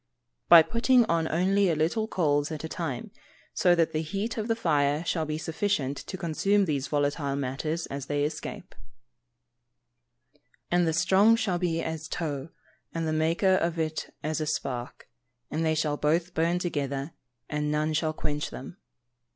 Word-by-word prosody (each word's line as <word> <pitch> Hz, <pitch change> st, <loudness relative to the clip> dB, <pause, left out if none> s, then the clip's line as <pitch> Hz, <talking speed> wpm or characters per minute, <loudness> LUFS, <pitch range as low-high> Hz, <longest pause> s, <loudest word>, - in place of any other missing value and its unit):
_ -, -, -48 dB
By 170 Hz, -2 st, +10 dB
putting 240 Hz, +4 st, +3 dB
on 165 Hz, -5 st, +1 dB
only 190 Hz, +4 st, +2 dB
a 165 Hz, -, +2 dB
little 170 Hz, +9 st, 0 dB
coals 145 Hz, -6 st, +1 dB
at 155 Hz, -1 st, -5 dB
a -, -, -3 dB
time, 160 Hz, -7 st, -4 dB, 0.4 s
so 175 Hz, -1 st, +4 dB
that 165 Hz, -1 st, +2 dB
the 155 Hz, -, 0 dB
heat 195 Hz, +8 st, -3 dB
of 220 Hz, -1 st, -3 dB
the 225 Hz, -, +1 dB
fire 150 Hz, -5 st, +1 dB
shall 165 Hz, -1 st, 0 dB
be 155 Hz, 0 st, -2 dB
sufficient 160 Hz, -4 st, -1 dB
to 190 Hz, -, -7 dB
consume 195 Hz, +4 st, +1 dB
these 140 Hz, -4 st, -1 dB
volatile 145 Hz, -1 st, 0 dB
matters 140 Hz, +5 st, -2 dB
as 140 Hz, 0 st, -6 dB
they 145 Hz, 0 st, 0 dB
escape. 150 Hz, +1 st, -5 dB, 1.6 s
[Verse: 150 Hz, -, -33 dB, 0.3 s
"And 175 Hz, -1 st, +3 dB
the 160 Hz, -, +1 dB
strong 190 Hz, +7 st, +5 dB
shall 200 Hz, -6 st, -1 dB
be 165 Hz, -2 st, 0 dB
as 160 Hz, 0 st, -4 dB
tow, 150 Hz, -3 st, -4 dB, 0.5 s
and 165 Hz, -1 st, -1 dB
the 155 Hz, -, 0 dB
maker 165 Hz, +5 st, +2 dB
of 170 Hz, -1 st, -1 dB
it 155 Hz, -1 st, -2 dB
as 155 Hz, +1 st, -1 dB
a 155 Hz, -, -2 dB
spark, 125 Hz, -5 st, -4 dB, 0.4 s
and 155 Hz, +2 st, -1 dB
they 160 Hz, -1 st, +2 dB
shall 150 Hz, -1 st, 0 dB
both 165 Hz, +4 st, +1 dB
burn 170 Hz, +2 st, +1 dB
together, 145 Hz, -4 st, -2 dB, 0.4 s
and 150 Hz, 0 st, -2 dB
none 155 Hz, +1 st, 0 dB
shall 155 Hz, 0 st, +1 dB
quench 150 Hz, -1 st, -3 dB
them." 135 Hz, +8 st, -9 dB
160 Hz, 175 wpm, -27 LUFS, 150-175 Hz, 1.6 s, By